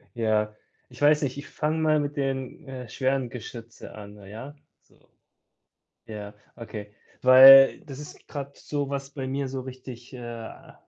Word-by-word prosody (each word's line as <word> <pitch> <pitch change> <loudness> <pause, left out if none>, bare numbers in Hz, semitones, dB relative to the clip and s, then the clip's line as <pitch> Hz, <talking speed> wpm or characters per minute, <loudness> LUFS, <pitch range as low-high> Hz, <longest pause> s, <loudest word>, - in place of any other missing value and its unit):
Ja. 105 -2 0 0.3
Ich 125 +2 -15
weiß 150 +1 +4
nicht, 135 0 -2
ich 145 - -8
fange 155 +1 -2
mal 155 -1 +3
mit 145 0 -4
den, 135 +2 -3
äh, 130 -2 -8
schweren 130 +1 -1
Geschütze 115 -2 -10
an, 105 -1 -11
ja? 115 +8 -9 0.3
So. - - -28 1.1
Ja, 105 -1 -8 0.2
okay. 105 -3 -8 0.3
Weil 135 +1 +9
das 140 -3 -10
ist 150 - -12
grad 140 -1 -7
so, 145 -2 -4
was 140 0 -5
bei 135 -2 -5
mir 135 +1 -2
so 130 0 -5
richtig, 125 -1 -10
äh 120 -2 -9
130 Hz, 155 wpm, -26 LUFS, 115-140 Hz, 1.1 s, Weil